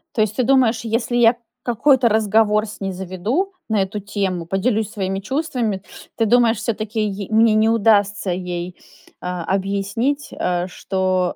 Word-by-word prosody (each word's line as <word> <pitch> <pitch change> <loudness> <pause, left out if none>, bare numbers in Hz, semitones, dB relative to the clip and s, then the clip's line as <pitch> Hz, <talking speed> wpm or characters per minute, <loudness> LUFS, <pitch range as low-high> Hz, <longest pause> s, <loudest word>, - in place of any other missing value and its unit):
То 220 - +2
есть 215 0 0
ты 255 - +1
думаешь, 245 -3 +3
если 230 +2 -1
я 235 0 +5 0.3
какой-то 245 +1 +3
разговор 215 0 +2
с 215 - -10
ней 195 -1 -2
заведу 190 - -2 0.2
на 215 -2 +2
эту 205 +2 -5
тему, 195 -4 -3
поделюсь 210 +4 0
своими 195 -3 -3
чувствами, 235 - -2 0.3
ты 225 - +1
думаешь, 235 0 +4
всё-таки 215 0 -2
й 200 -2 -3
мне 220 0 +5
не 215 +1 +3
удастся 205 -3 +2
ей, 180 0 -4 0.5
а, 180 -1 -4
объяснить, 200 - -1
э, 180 0 -1
что 185 -1 -1
210 Hz, 155 wpm, -20 LUFS, 190-230 Hz, 0.5 s, я